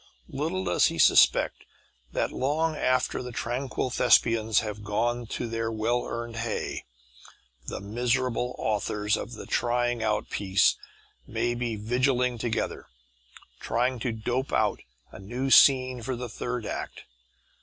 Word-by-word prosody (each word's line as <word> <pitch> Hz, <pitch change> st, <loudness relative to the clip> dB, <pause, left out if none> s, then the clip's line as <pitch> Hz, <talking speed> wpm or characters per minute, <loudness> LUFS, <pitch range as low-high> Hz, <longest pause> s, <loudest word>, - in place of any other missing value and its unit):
Little 165 Hz, +7 st, -2 dB
does -, -, +3 dB
he -, -, -4 dB
suspect -, -, +4 dB, 0.5 s
that -, -, -1 dB
long 155 Hz, +4 st, 0 dB
after 130 Hz, -3 st, +1 dB
the 125 Hz, -1 st, -6 dB
tranquil 125 Hz, +2 st, -3 dB
thespians 115 Hz, -3 st, +3 dB
have 105 Hz, -1 st, -6 dB
gone 120 Hz, +3 st, -1 dB
to 120 Hz, -, -4 dB
their 115 Hz, 0 st, -2 dB
well 115 Hz, +2 st, 0 dB
earned 115 Hz, 0 st, -5 dB
hay, 115 Hz, -1 st, -3 dB, 0.8 s
the -, -, -4 dB
miserable 125 Hz, +3 st, -1 dB
authors 105 Hz, -1 st, 0 dB
of 120 Hz, -, -6 dB
the -, -, -8 dB
trying 120 Hz, 0 st, 0 dB
out 105 Hz, -1 st, -1 dB
piece 95 Hz, -1 st, +3 dB, 0.5 s
may 120 Hz, -, -1 dB
be 120 Hz, -2 st, -2 dB
vigiling 125 Hz, +2 st, 0 dB
together, 115 Hz, 0 st, -2 dB, 0.7 s
trying 125 Hz, +2 st, 0 dB
to 120 Hz, +2 st, -1 dB
dope 120 Hz, +4 st, -2 dB
out -, -, +1 dB, 0.3 s
a -, -, -11 dB
new 125 Hz, +7 st, -3 dB
scene 130 Hz, -3 st, +6 dB
for 130 Hz, +3 st, -3 dB
the 125 Hz, 0 st, -6 dB
third 120 Hz, +1 st, -4 dB
act. -, -, -5 dB
120 Hz, 135 wpm, -27 LUFS, 110-125 Hz, 0.8 s, scene